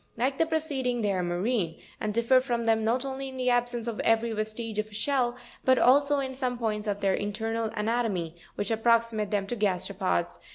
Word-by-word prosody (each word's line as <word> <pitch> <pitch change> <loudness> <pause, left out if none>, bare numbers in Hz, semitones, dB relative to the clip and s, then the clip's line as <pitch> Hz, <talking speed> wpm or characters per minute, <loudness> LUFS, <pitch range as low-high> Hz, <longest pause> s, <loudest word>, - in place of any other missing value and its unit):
Like 265 +3 0
the 325 - +3
preceding, 275 -7 -1
they 205 - +2
are 185 -2 0
marine, 175 0 -1 0.2
and 215 - -1
differ 235 +4 +4
from 240 -3 -2
them, 225 -1 +3
not 240 +4 +1
only 270 0 -4
in 260 - -9
the 255 -1 +1
absence 245 -1 0
of 230 -3 -4
every 225 +1 +2
vestige 215 0 -3
of 215 0 -3
shell, 245 +1 +1 0.3
but 260 0 +4
also 285 +4 +5
in 265 -1 -2
some 255 -2 -2
points 215 -2 -2
of 205 0 -2
their 195 -1 +2
internal 225 +3 -2
anatomy, 210 -7 -1 0.2
which 205 +2 -2
approximate 225 -1 +2
them 205 -2 0
to 240 - -3
the 215 - -10
gasteropods. 185 - 0
225 Hz, 200 wpm, -28 LUFS, 205-250 Hz, 0.3 s, also